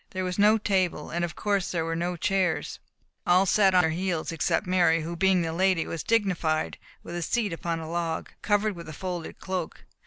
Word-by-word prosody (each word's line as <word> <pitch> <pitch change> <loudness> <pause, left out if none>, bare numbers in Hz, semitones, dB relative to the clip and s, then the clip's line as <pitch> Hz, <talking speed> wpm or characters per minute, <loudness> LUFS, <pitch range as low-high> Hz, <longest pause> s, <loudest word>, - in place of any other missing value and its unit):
There 185 0 -3
was 180 +1 -3
no 210 +2 +6
table, 185 -7 0
and 175 +1 -1
of 175 - -3
course 200 -3 0
there 165 -2 -1
were 165 0 -2
no 175 +2 -2
chairs. 175 -4 0 0.5
All 180 +2 +5
sat 195 -1 +4
on 180 - +7
their 160 -2 +1
heels, 175 -1 -2
except 165 -2 0
Mary, 175 -3 +3
who 170 +2 -4
being 185 0 +3
the 165 -1 -2
lady 185 -1 +2
was 165 - -4
dignified 180 -8 0 0.2
with - - -8
a 175 - -3
seat 210 +2 0
upon 165 0 -3
a 160 - -6
log, 165 -1 -3
covered 205 0 +1
with 170 -2 -9
a - - -7
folded 180 -1 -5
cloak. 185 -3 -4
175 Hz, 210 wpm, -27 LUFS, 165-190 Hz, 0.5 s, on